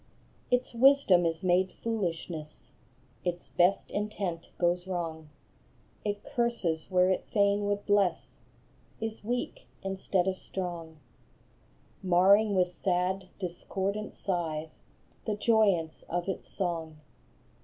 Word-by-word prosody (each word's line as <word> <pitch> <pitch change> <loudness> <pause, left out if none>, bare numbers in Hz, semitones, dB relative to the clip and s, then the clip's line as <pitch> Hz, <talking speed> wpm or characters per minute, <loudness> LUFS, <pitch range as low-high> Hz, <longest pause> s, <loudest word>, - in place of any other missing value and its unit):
Its 250 0 +1
wisdom 235 -9 +5
is 165 +1 -3
made 185 +1 +3
foolishness; 170 -8 -3 0.5
Its 175 -1 -3
best 180 +2 +2
intent 205 -5 -3
goes 175 +1 +1
wrong; 165 -4 -4 0.7
It 205 -1 -2
curses 235 - -1
where 185 0 +4
it 185 - -1
fain 205 -1 +3
would 205 0 -1
bless, 180 - +1 0.6
Is 225 -1 -4
weak 245 +3 -3 0.2
instead 190 -1 0
of 185 -1 -1
strong, 170 -4 -5 1.0
Marring 195 +3 +5
with 180 -1 +3
sad, 185 +1 0
discordant 195 +3 -3
sighs 160 -4 -3 0.4
The 215 - 0
joyance 205 -7 +2
of 175 +1 -1
its 190 - -4
song. 165 -4 -3
185 Hz, 110 wpm, -30 LUFS, 175-205 Hz, 1.0 s, wisdom